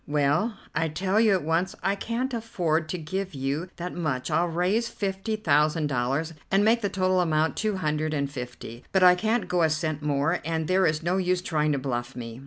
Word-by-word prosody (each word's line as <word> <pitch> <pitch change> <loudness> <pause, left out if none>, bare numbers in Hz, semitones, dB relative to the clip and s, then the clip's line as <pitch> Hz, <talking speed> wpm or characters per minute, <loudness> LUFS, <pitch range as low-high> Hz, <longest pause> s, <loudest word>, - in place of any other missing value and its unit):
Well, 150 +9 +1 0.2
I 165 +1 +1
tell 190 +6 0
you 220 -2 +5
at 185 - 0
once 165 +4 0
I 195 - +2
can't 235 +5 -3
afford 170 -9 -1
to 180 - -2
give 190 +4 -4 0.4
that 175 +1 -5
much. 150 -6 -2
I'll 165 +3 +2
raise 185 +8 0
fifty 195 +2 -3
thousand 150 -4 +2
dollars, 140 +5 -1 0.2
and 195 +2 +3
make 230 +2 +4
the 205 - 0
total 185 -1 +1
amount 160 -2 +1
two 215 -3 -1
hundred 155 -2 -1
and 140 -2 0
fifty; 125 -3 -8
but 190 -1 +3
I 180 0 +9
can't 220 +5 0
go 180 -1 +1
a 160 - +4
cent 155 -1 -2
more, 145 +3 +1
and 160 0 -2
there 185 +1 +3
is 155 +1 -1
no 175 +3 +1
use 180 -1 0
trying 155 -3 +1
to - - 0
bluff 125 -2 -3
me." 115 -1 -7
165 Hz, 205 wpm, -26 LUFS, 150-190 Hz, 0.4 s, I